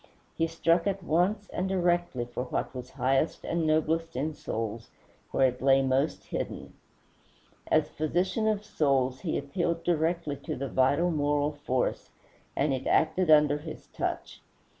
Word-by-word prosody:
He 165 Hz, -, +1 dB
struck 165 Hz, +2 st, +2 dB
at 195 Hz, -1 st, -1 dB
once 190 Hz, +6 st, +1 dB
and 185 Hz, +1 st, -2 dB
directly 175 Hz, -8 st, +1 dB
for 120 Hz, +1 st, -5 dB
what 125 Hz, -, -3 dB
was 125 Hz, -1 st, -7 dB
highest 135 Hz, +5 st, 0 dB
and 165 Hz, -1 st, 0 dB
noblest 160 Hz, +1 st, +1 dB
in 150 Hz, +5 st, -1 dB
souls 115 Hz, -4 st, -4 dB, 0.4 s
where 130 Hz, -1 st, +3 dB
it 125 Hz, 0 st, -9 dB
lay 135 Hz, 0 st, +5 dB
most 135 Hz, +3 st, 0 dB
hidden. -, -, -5 dB, 0.9 s
As 155 Hz, -1 st, +3 dB
physician 180 Hz, +9 st, -1 dB
of 210 Hz, -1 st, 0 dB
souls 135 Hz, -8 st, +1 dB
he -, -, -2 dB
appealed 170 Hz, +4 st, -2 dB
directly 165 Hz, -3 st, 0 dB
to 140 Hz, -, -5 dB
the 135 Hz, +1 st, -4 dB
vital 140 Hz, +7 st, +2 dB
moral 145 Hz, -1 st, +1 dB
force, 145 Hz, -4 st, -2 dB, 0.5 s
and 140 Hz, 0 st, +1 dB
it 130 Hz, 0 st, -3 dB
acted 160 Hz, +2 st, +2 dB
under 150 Hz, -1 st, +5 dB
his 155 Hz, +1 st, -9 dB
touch. -, -, -4 dB
155 Hz, 150 wpm, -28 LUFS, 135-170 Hz, 0.9 s, lay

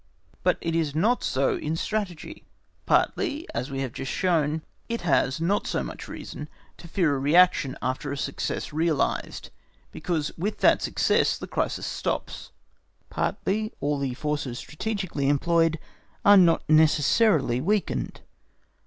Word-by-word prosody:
But -, -, +2 dB
it 165 Hz, -1 st, -2 dB
is 155 Hz, -3 st, 0 dB
not 225 Hz, +10 st, +2 dB
so 135 Hz, +1 st, +1 dB
in 155 Hz, +2 st, -3 dB
Strategy. 185 Hz, -3 st, -4 dB, 0.4 s
Partly, 300 Hz, +4 st, +1 dB
as 130 Hz, -, -3 dB
we 135 Hz, 0 st, -3 dB
have 130 Hz, -3 st, -4 dB
just 135 Hz, -, -5 dB
shown, 160 Hz, -4 st, +1 dB, 0.3 s
it 235 Hz, 0 st, -2 dB
has 135 Hz, -5 st, +1 dB
not 190 Hz, +5 st, 0 dB
so -, -, -1 dB
much -, -, -8 dB
reason -, -, -8 dB, 0.3 s
to 170 Hz, -, -12 dB
fear 165 Hz, -4 st, +1 dB
a -, -, -2 dB
reaction 150 Hz, -2 st, +4 dB
after 130 Hz, +2 st, -2 dB
a 140 Hz, -, -3 dB
success 140 Hz, +2 st, -3 dB
realised, 160 Hz, -1 st, -1 dB, 0.4 s
because 155 Hz, -2 st, -2 dB
with 205 Hz, +5 st, -2 dB
that -, -, +5 dB
success -, -, +2 dB
the -, -, -7 dB
crisis -, -, -2 dB
stops; -, -, -4 dB, 0.6 s
partly 215 Hz, +3 st, -1 dB
all 145 Hz, 0 st, -1 dB
the 135 Hz, -3 st, -2 dB
forces 145 Hz, -4 st, -3 dB
strategically 170 Hz, -, -3 dB
employed 165 Hz, +2 st, +2 dB, 0.5 s
are 205 Hz, -, +8 dB
not 175 Hz, -4 st, +4 dB
necessarily 155 Hz, -, +3 dB
weakened. 205 Hz, +6 st, -1 dB
160 Hz, 140 wpm, -26 LUFS, 140-185 Hz, 0.6 s, are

